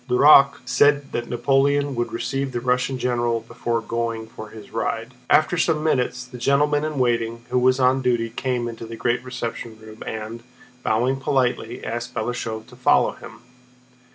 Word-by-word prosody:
Duroc 140 +1 +6
said 145 +3 +3
that 120 - -3
Napoleon 140 +3 +2
would 120 -1 -2
receive 135 +3 -3
the 120 - -1
Russian 125 +2 0
general 120 -2 0
before 115 +1 -3
going 115 -1 -3
for 110 -1 -10
his 105 -1 -12
ride. 115 +2 -3 0.2
After 160 +2 +3
some 160 -2 +1
minutes, 125 -4 0
the 125 0 -11
gentleman 145 +3 +2
in 155 -1 -3
waiting 115 -2 0
who 125 - +3
was 130 +1 +3
on 130 +1 +3
duty 120 -3 0
came 125 0 -2
into 115 -1 -7
the 115 - -7
great 120 +1 -1
reception 120 -3 -5
room 110 0 -13
and, 110 +1 -5 0.4
bowing 120 +4 +1
politely, 125 -3 -1
asked 120 +1 -4
Balashëv 110 -1 -3
to - - -16
follow - - +3
him. - - -13
125 Hz, 165 wpm, -23 LUFS, 115-135 Hz, 0.4 s, Duroc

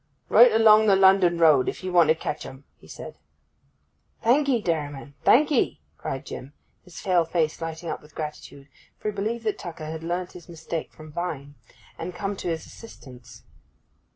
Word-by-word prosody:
'Right 240 0 +7
along 220 -1 +6
the 200 - +6
London 190 -2 +5
road, 155 -6 +5
if - - -7
you 185 -1 -4
want 170 -3 +6
to 160 - +5
catch 150 -2 -5
'em!' 135 +1 -11 0.2
he - - -18
said. - - -10 1.0
'Thank 280 +5 +3
'ee, 250 -3 +3
dairyman, 145 -6 -3
thank 295 +5 +5
'ee!' 270 - +1 0.2
cried 135 - -5
Jim, 135 +3 -8 0.3
his 180 -2 -12
pale 180 -3 +2
face 165 -1 -1
lighting 165 +1 -5
up - - -4
with 150 0 -19
gratitude, 150 -2 -7 0.3
for 215 - -3
he - - -15
believed 225 +4 -3
that 215 -2 -2
Tucker 165 -3 -7
had 160 +1 -6
learnt 175 +2 -3
his 175 -2 -13
mistake 165 -1 -6
from 155 -1 -13
Vine, 150 -4 -5 0.5
and 175 +2 -5
had - - -13
come 200 0 -2
to - - -5
his 165 -1 -3
assistance. 130 - -14
170 Hz, 185 wpm, -25 LUFS, 155-200 Hz, 1.0 s, Right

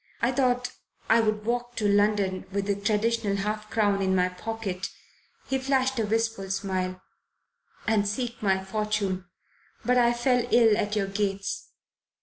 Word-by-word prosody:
I 235 - +2
thought 250 -1 +1 0.4
I 225 - +6
would 215 -1 0
walk 240 +1 -2
to 210 - 0
London, 200 -2 +2
with 200 0 -1
the 200 - +1
traditional 210 +1 0
half 210 +1 -3
crown 205 -3 +2
in 190 -1 +2
my 180 0 +3
pocket" 195 0 -4 0.6
he 265 - 0
flashed 265 -1 +1
a 220 - 0
wistful 225 -2 -1
smile 185 -1 -2 0.8
"and 210 -2 +2
seek 235 +3 -3
my 190 -2 +1
fortune. 200 -2 -1 0.6
But 250 0 +4
I 240 0 +4
fell 245 0 +2
ill 230 -3 +5
at 210 0 -1
your 205 -2 +1
gates." 195 0 -2
210 Hz, 150 wpm, -27 LUFS, 195-235 Hz, 0.8 s, I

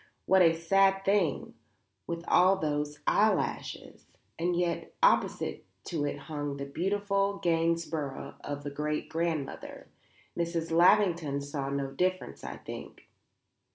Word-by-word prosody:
What 190 0 +5
a 165 -2 +5
sad 195 +3 +3
thing; 195 -6 +1 0.5
with 170 0 -4
all 185 +2 +5
those 150 -4 -2
eyelashes! - - 0 0.3
And 175 +1 +1
yet 175 -1 -2
opposite - - +2 0.2
to 155 -4 -2
it 145 - -3
hung 145 -2 -4
the 140 - -4
beautiful 200 +5 0
Gainsborough 165 -4 -1
of 145 0 -5
a 145 - -3
great 150 +1 -2
grandmother. 160 -4 -3 0.5
Mrs. 170 -1 -2
Lavington 170 -4 +4
saw 140 -1 -4
no 140 -1 -2
difference, 160 - -2
I 70 0 -6
think." 70 - -10
165 Hz, 120 wpm, -30 LUFS, 145-180 Hz, 0.5 s, What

